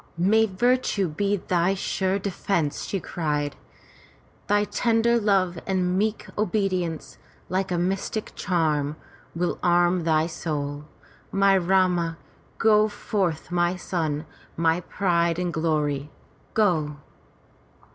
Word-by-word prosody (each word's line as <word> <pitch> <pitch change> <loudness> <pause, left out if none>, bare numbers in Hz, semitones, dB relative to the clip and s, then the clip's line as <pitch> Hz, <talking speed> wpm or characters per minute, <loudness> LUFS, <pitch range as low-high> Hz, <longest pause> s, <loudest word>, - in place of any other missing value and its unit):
"May 215 +6 +4
virtue 215 -1 +1
be 200 +6 0
thy 180 +1 +1
sure 190 0 0
defence!" 185 -5 -1
she 195 - -2
cried. 150 -5 -2 0.9
"Thy 205 0 +3
tender 235 +2 +2
love 190 -5 +1
and 185 -2 +1
meek 215 +3 0
obedience, 185 -5 -1 0.3
like 185 +1 -1
a 175 - +1
mystic 195 +4 -2
charm, 155 -5 0 0.4
will 175 +1 -1
arm 175 0 +3
thy 160 -1 +2
soul, 150 -3 -4 0.5
my 195 0 +4
Rama! 180 -2 +2 0.4
Go 215 -1 +4
forth 190 -6 -2
my 175 0 +1
son, 160 -4 -2 0.3
my 165 +1 +2
pride 170 -2 +1
and 180 -1 -2
glory, 150 -3 0 0.5
go!" 160 -9 +2
180 Hz, 110 wpm, -25 LUFS, 165-195 Hz, 0.9 s, May